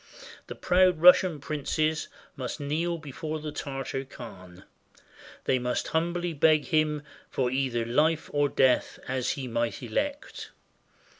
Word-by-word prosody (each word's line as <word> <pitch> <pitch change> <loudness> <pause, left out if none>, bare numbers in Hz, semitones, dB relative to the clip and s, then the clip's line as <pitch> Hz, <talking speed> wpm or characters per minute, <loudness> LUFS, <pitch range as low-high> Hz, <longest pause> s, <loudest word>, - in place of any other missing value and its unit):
The - - -7
proud 180 -2 +3
Russian 180 -1 +6
princes 155 +2 -1 0.3
must 130 -4 -5
kneel 160 +4 -1
before 155 +1 -5
the 155 0 -5
Tartar 135 -2 -4
khan. 95 -8 -11 0.8
They 130 - +1
must 125 0 -2
humbly 170 +1 -1
beg 155 0 +4
him 155 -3 +1 0.3
for 125 -2 -1
either 130 -3 0
life 155 +7 +1
or 145 -1 +2
death, 130 -2 +2
as 130 -1 -1
he 135 -2 -5
might 115 +2 -2
elect. 280 - -3
145 Hz, 130 wpm, -27 LUFS, 130-160 Hz, 0.8 s, Russian